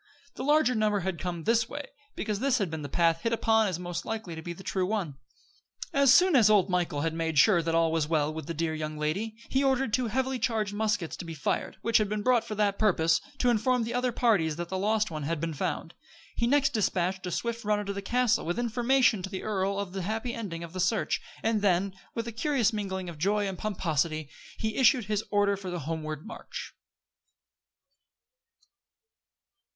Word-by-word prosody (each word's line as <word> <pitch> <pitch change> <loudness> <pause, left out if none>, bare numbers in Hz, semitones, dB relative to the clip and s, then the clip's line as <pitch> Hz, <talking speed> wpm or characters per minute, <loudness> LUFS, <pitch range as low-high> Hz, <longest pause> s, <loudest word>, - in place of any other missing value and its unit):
The - - -6
larger 295 -2 +4
number 210 -3 +1
had 185 -2 -3
come 175 -3 -4
this 230 +3 +2
way, 290 0 -5 0.3
because 210 -2 -2
this 265 0 +2
had 195 -8 -1
been 160 -1 -4
the 145 - -6
path 165 +2 +2
hit 230 - 0
upon 225 -1 +3
as 185 -4 -2
most 175 -1 -4
likely 220 -6 -4
to 160 - -7
be 175 - -6
the 170 +3 -9
true 185 -1 -1
one. 185 -10 -2 0.8
As 275 -2 +5
soon 360 +4 +6
as 225 -5 +6
old 200 -3 +4
Michael 175 -5 0
had 165 +1 -1
made 160 -1 -2
sure 175 +4 +6
that 165 0 -1
all 165 -1 +3
was 160 -2 0
well 155 -1 +1
with 160 -2 -6
the 170 - -3
dear 160 0 -1
young 155 -1 -4
lady, 190 +9 -2
he 270 +1 +1
ordered 265 -4 +1
two 255 -2 +2
heavily 260 +3 -1
charged 220 -3 0
muskets 210 -5 -1
to - - -6
be 165 -1 -7
fired, 150 - -2
which 230 -1 +4
had 210 -2 0
been 210 0 -2
brought 250 -1 +3
for 215 - -6
that 205 -1 +1
purpose, 165 -6 +3 0.2
to 245 - +3
inform 240 +2 +2
the 230 - -4
other 250 0 +1
parties 200 -11 +2
that 170 +1 -5
the 190 - -2
lost 215 0 +1
one 155 -1 -4
had 155 +2 -2
been 165 +1 -2
found. 145 - -3 0.4
He 235 - +1
next 280 +2 +3
dispatched 185 -3 0
a - - -3
swift 235 +5 -3
runner 210 0 0
to 200 - -3
the 200 - -4
castle, 245 +2 +1
with 175 +2 -2
information 240 -1 +2
to 190 - -5
the 190 -1 -5
earl 195 -2 -1
of 200 -2 -4
the 195 - -3
happy 220 +6 -2
ending 175 -7 -5
of 170 0 -9
the 185 - -5
search; 195 +5 +1 0.2
and 220 -1 +1
then, 195 -1 +2 0.2
with 230 0 -3
a - - -3
curious 235 -1 +1
mingling 190 -3 -3
of 165 -3 -8
joy 205 +4 +1
and 190 - -3
pomposity, 160 -6 -1 0.3
he 220 0 -2
issued 250 -3 +4
his 210 +1 -1
order 205 -1 +2
for 195 -1 -7
the 175 -1 -4
homeward 155 0 -4
march. 225 - -8
200 Hz, 215 wpm, -28 LUFS, 170-225 Hz, 0.8 s, soon